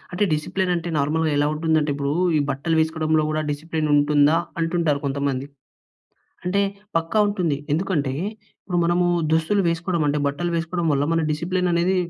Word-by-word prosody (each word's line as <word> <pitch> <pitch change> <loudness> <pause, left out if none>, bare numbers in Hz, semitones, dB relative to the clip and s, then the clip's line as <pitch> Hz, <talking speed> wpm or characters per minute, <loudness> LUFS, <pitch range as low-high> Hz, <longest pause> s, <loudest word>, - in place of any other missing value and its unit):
అంటే 205 +4 +1
డిసిప్లైన్ 180 +4 -1
అంటే 170 +1 -4
నార్మల్‌గా 155 +2 +1
ఎలా 145 - +3
ఉంటుంది 160 0 +1
అంటే 150 0 -1
ఇప్పుడు 140 0 -2 0.3
ఈ - - +2
బట్టలు 160 +5 -1
వేసుకోవడంలో 160 -1 +1
కూడా 155 0 -1
డిసిప్లైన్ 155 +1 -2
ఉంటుందా, 145 +1 +4 0.2
అంటుంటారు 165 -3 0
కొంతమంది. 140 -1 -1 1.0
అంటే 195 +3 +1 0.4
పక్కా 165 +6 +1
ఉంటుంది. 180 -8 0 0.2
ఎందుకంటే 155 -6 0 0.5
ఇప్పుడు 180 -3 -3
మనము 175 +1 +2 0.3
దుస్తులు 165 +6 +2
వేసుకోవడం 170 0 -1
అంటే 145 +1 +1
బట్టలు 170 +5 -2
వేసుకోవడం 170 +1 -2
వల్ల 140 +1 +1
మన 165 - +2
డిసిప్లైన్ 180 +4 -1
అనేది 175 +3 +2
160 Hz, 155 wpm, -22 LUFS, 145-175 Hz, 1.0 s, ఉంటుందా